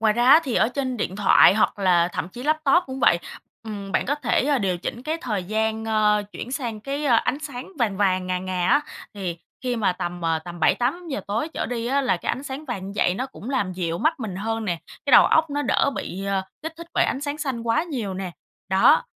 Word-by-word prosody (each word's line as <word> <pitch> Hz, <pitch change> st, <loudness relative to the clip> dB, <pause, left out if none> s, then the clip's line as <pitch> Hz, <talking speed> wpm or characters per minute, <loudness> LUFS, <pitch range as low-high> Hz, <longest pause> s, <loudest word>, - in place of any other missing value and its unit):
Ngoài 220 Hz, -1 st, +4 dB
ra 240 Hz, +2 st, +1 dB
á, 295 Hz, +4 st, +9 dB
thì 255 Hz, -, -2 dB
ở 220 Hz, -, +3 dB
trên 255 Hz, -1 st, -3 dB
điện 190 Hz, -3 st, -3 dB
thoại 195 Hz, -2 st, +6 dB
hoặc 215 Hz, -, +1 dB
là 180 Hz, -3 st, +3 dB
thậm 170 Hz, -, -3 dB
chí 240 Hz, +6 st, -9 dB
laptop 310 Hz, +3 st, +3 dB
cũng 265 Hz, 0 st, -6 dB
vậy, 170 Hz, -, +5 dB, 0.4 s
ừm, 205 Hz, -3 st, -7 dB
bạn -, -, +1 dB
có 285 Hz, -, +1 dB
thể, 275 Hz, -3 st, 0 dB
ơ, 285 Hz, -2 st, +2 dB
điều 190 Hz, -4 st, 0 dB
chỉnh 235 Hz, +7 st, -5 dB
cái 310 Hz, +4 st, -2 dB
thời 210 Hz, -, -2 dB
gian, 220 Hz, +2 st, -1 dB
ơ, 210 Hz, -1 st, +2 dB
chuyển 245 Hz, -, -7 dB
sang 235 Hz, -7 st, -3 dB
cái, 280 Hz, +5 st, -4 dB
ơ, 260 Hz, -5 st, +4 dB
ánh 270 Hz, -, 0 dB
sáng 285 Hz, +2 st, -7 dB
vàng 215 Hz, -6 st, +1 dB
vàng, 185 Hz, -2 st, +1 dB
ngà 185 Hz, 0 st, -1 dB
ngà 180 Hz, -1 st, -2 dB
á. 285 Hz, -, +5 dB, 0.3 s
Thì 185 Hz, -4 st, -4 dB, 0.3 s
khi 250 Hz, -1 st, -1 dB
mà 210 Hz, -5 st, +2 dB
tầm, 175 Hz, 0 st, -5 dB
ờ, 165 Hz, -1 st, +1 dB
tầm 170 Hz, +1 st, -9 dB
7:00-8:00 280 Hz, -, +1 dB
tối 220 Hz, +10 st, -1 dB
trở -, -, -2 dB
đi 235 Hz, -1 st, -3 dB
á, 275 Hz, +3 st, +2 dB
là 260 Hz, -, +1 dB
cái -, -, -7 dB
ánh 260 Hz, -, -4 dB
sáng 280 Hz, +2 st, -6 dB
vàng 215 Hz, -9 st, -5 dB
như 200 Hz, -, -6 dB
vậy 180 Hz, -, +2 dB
nó 255 Hz, +7 st, -3 dB
cũng 260 Hz, -2 st, -9 dB
làm 205 Hz, -9 st, 0 dB
dịu 170 Hz, -2 st, -2 dB
mắt 315 Hz, -, +1 dB
mình 195 Hz, -5 st, -4 dB
hơn 225 Hz, +2 st, -2 dB
nè, 175 Hz, -5 st, -1 dB, 0.3 s
cái 280 Hz, -, +1 dB
đầu -, -, +9 dB
óc 320 Hz, -1 st, +3 dB
nó 290 Hz, +1 st, -1 dB
đỡ 280 Hz, -, +2 dB
bị, 195 Hz, +2 st, -5 dB
ờ, 195 Hz, -1 st, 0 dB, 0.2 s
kích 320 Hz, 0 st, -4 dB
thích 335 Hz, 0 st, -9 dB
bởi -, -, +4 dB
ánh 270 Hz, -, -1 dB
sáng 285 Hz, +1 st, -3 dB
xanh 270 Hz, -6 st, -2 dB
quá 230 Hz, +5 st, +1 dB
nhiều 245 Hz, -, -4 dB
nè. 185 Hz, -1 st, -4 dB, 0.4 s
Đó. 190 Hz, +1 st, +5 dB
225 Hz, 250 wpm, -24 LUFS, 190-275 Hz, 0.4 s, á